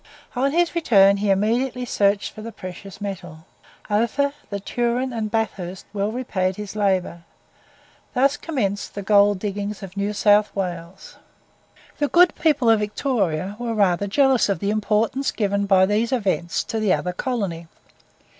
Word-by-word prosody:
On 270 +3 +1
his 345 +2 +1
return, 200 - +4
he 205 0 -1
immediately 240 +6 +1
searched 200 -3 +1
for 215 - -10
the 230 +1 -7
precious 185 0 -10
metal; 185 -5 -7 0.4
Ophir, 235 +7 +1 0.2
the 200 - -4
Turon, 240 +4 -1
and 220 -2 -2
Bathurst 195 -5 -3
well 205 +1 -1
repaid 190 -7 -2
his 210 0 -7
labour. 190 -4 0 0.9
Thus 275 +3 +3
commenced 205 -13 -3
the 200 - -5
gold 205 0 +4
diggings 205 +1 -4
of 190 0 -9
New 200 +1 -1
South 210 0 +4
Wales. 180 -1 -6 0.8
The 290 - +2
good 350 +3 +5
people 290 -6 +1
of 225 -1 +5
Victoria 205 - -1
were 235 -2 -3
rather 200 -1 +2
jealous 265 +2 +3
of 195 - +1
the 200 +5 -1
importance 215 +5 0
given 200 -1 -1
by 190 -1 +5
these 215 +5 0
events 190 -8 0
to 225 - -3
the 210 -4 +2
other 180 - -2
colony. 190 -8 -3
205 Hz, 155 wpm, -22 LUFS, 195-235 Hz, 0.9 s, good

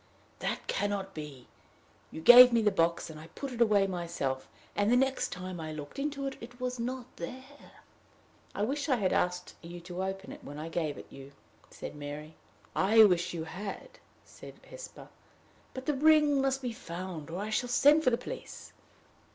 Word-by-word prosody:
"That - - -3
can 205 - -1
not 195 -1 -3
be. 145 -5 -9 0.6
You 160 - -8
gave 245 +6 +10
me 230 -1 +3
the 210 - +4
box, 170 -1 +1
and 155 - -10
I 160 - -11
put 275 -2 -5
it 240 -1 -4
away 210 -4 +5
myself, 170 -8 -3 0.3
and, 205 +2 +2
the - - +5
next 265 +1 +1
time 180 -1 -6
I 155 -1 -5
looked 150 - -8
in 295 +2 -1
it, 275 -1 -4
it 245 +2 -11
was 250 -1 -3
not 250 +1 -3
there." 260 +10 -10 0.7
"I 200 - -1
wish 285 +6 -2
I 260 - +4
had 195 -6 0
asked 180 0 -1
you 175 +1 -9
to 180 +1 -6
open 190 0 -5
it - - -11
when 145 +1 -8
I 155 +2 -5
gave 160 -4 -2
it - - -9
you," 135 +1 -12 0.4
said - - -8
Mary. 150 +2 -7 0.4
"I 220 +3 +6
wish 180 -4 +3
you 160 - -3
had," 195 - -7 0.3
said - - -12
Hesper. - - -10 0.7
"But 260 0 -6
the 300 - +1
ring 300 -1 +4
must 270 0 0
be 245 -2 -2
found, 170 -5 -7
or 170 - -5
I 210 +3 -4
shall 245 +3 0
send 295 +5 +5
for 255 - +5
the 235 - +1
police." - - -9
205 Hz, 190 wpm, -30 LUFS, 170-255 Hz, 0.7 s, gave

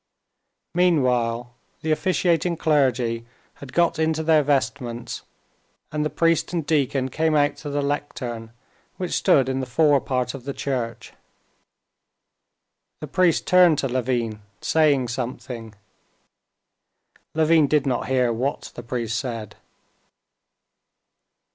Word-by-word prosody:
Meanwhile 125 -9 +1 0.3
the 160 - 0
officiating 170 0 +1
clergy 125 -7 +1 0.3
had 140 -2 -10
got 170 -2 +2
into 160 0 +1
their 160 -1 +4
vestments, 130 -4 -2 0.7
and 150 0 -1
the 150 - 0
priest 165 0 +1
and 165 -4 -1
deacon 140 -4 +1
came 160 +3 +1
out 145 0 +2
to 150 - -7
the 145 0 -1
lectern, 125 -5 -4 0.5
which 180 -2 -4
stood 135 -3 +3
in 130 0 -1
the 130 - -3
forepart 130 -3 +2
of 135 -3 -8
the 140 +1 -5
church. 125 -4 -4 1.9
The - - -5
priest 180 -3 +2
turned 180 -4 +5
to 135 - 0
Levin 120 -4 -1 0.2
saying 145 -4 +2
something. 120 -2 -5 1.6
Levin 160 -1 +4
did 150 -1 +2
not 125 -3 -1
hear 125 -2 +2
what 130 +5 -3
the - - -7
priest 115 -1 -2
said. 115 -4 -5
135 Hz, 115 wpm, -23 LUFS, 120-155 Hz, 1.9 s, turned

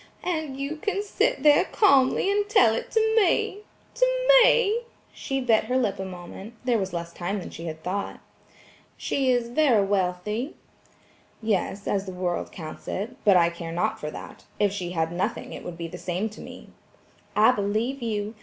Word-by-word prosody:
"And 315 -6 -3
you 280 +3 -3
can 405 +4 -2
sit 445 +4 0
there 295 -1 +6
calmly 280 -1 +3
and 410 0 0
tell 245 - +5
it 225 - -4
to 445 0 +2
me–to 420 +5 0 0.4
me–," 465 -1 +3 0.3
she 270 0 -3
bit 235 -4 +2
her 255 - 0
lip 220 -7 0
a 190 - -3
moment; 190 +4 -9
there 240 -3 +2
was 190 -1 -3
less 170 0 -5
time 180 +4 -3
than 180 - -8
she 165 - -8
had 160 -1 -6
thought. 200 +2 -3 0.8
"She 270 -2 0
is 245 -2 +1
very 245 -6 +3
wealthy?" 200 - -1 0.8
"Yes, 205 -2 -1
as 200 0 -1
the 185 - -5
world 180 -1 -2
counts 155 -3 -9
it, 220 +6 -4
but 200 -3 +6
I 170 -1 +4
care 170 -1 -7
not 215 +6 -1
for 150 - -4
that; - - -10
if 205 -2 +3
she 180 -4 -4
had 165 -1 0
nothing 175 +2 -3
it - - -8
would 175 -1 -7
be 170 -1 -5
the 165 - -9
same 185 +5 -2
to 215 - -12
me." - - -11 0.7
"I 220 +3 +6
believe 220 +5 -1
you. 215 -2 -2
215 Hz, 180 wpm, -25 LUFS, 180-275 Hz, 0.8 s, there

